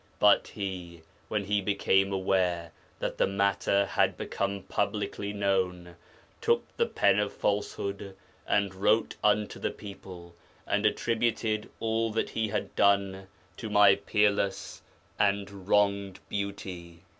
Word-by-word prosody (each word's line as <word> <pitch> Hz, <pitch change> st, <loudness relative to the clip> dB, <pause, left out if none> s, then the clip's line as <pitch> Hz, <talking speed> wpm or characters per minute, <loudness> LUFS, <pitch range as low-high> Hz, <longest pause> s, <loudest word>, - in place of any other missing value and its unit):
But 105 Hz, 0 st, +5 dB
he, 90 Hz, -5 st, -6 dB, 0.2 s
when 105 Hz, -2 st, -2 dB
he 100 Hz, +1 st, +1 dB
became 100 Hz, -1 st, +2 dB
aware 90 Hz, -3 st, 0 dB, 0.3 s
that -, -, -4 dB
the -, -, +4 dB
matter 100 Hz, 0 st, +1 dB
had -, -, +1 dB
become 100 Hz, -1 st, -3 dB
publicly 100 Hz, 0 st, -2 dB
known, 95 Hz, -4 st, -1 dB, 0.5 s
took -, -, +2 dB
the -, -, +1 dB
pen 95 Hz, -, +3 dB
of 105 Hz, -1 st, 0 dB
falsehood, 100 Hz, -1 st, -2 dB, 0.3 s
and 100 Hz, -2 st, +1 dB
wrote 105 Hz, +4 st, +2 dB
unto 105 Hz, 0 st, +2 dB
the -, -, -1 dB
people, 90 Hz, -4 st, -10 dB, 0.3 s
and -, -, +2 dB
attributed 115 Hz, -2 st, 0 dB
all 115 Hz, 0 st, 0 dB
that 110 Hz, -, -1 dB
he 110 Hz, -1 st, -1 dB
had 100 Hz, -, -3 dB
done 100 Hz, -1 st, +2 dB, 0.3 s
to 110 Hz, -, -6 dB
my 105 Hz, -1 st, +7 dB
peerless 100 Hz, 0 st, 0 dB, 0.4 s
and 100 Hz, -1 st, 0 dB
wronged 100 Hz, -2 st, +2 dB
Beauty.' 90 Hz, -4 st, -5 dB
100 Hz, 125 wpm, -29 LUFS, 95-105 Hz, 0.5 s, my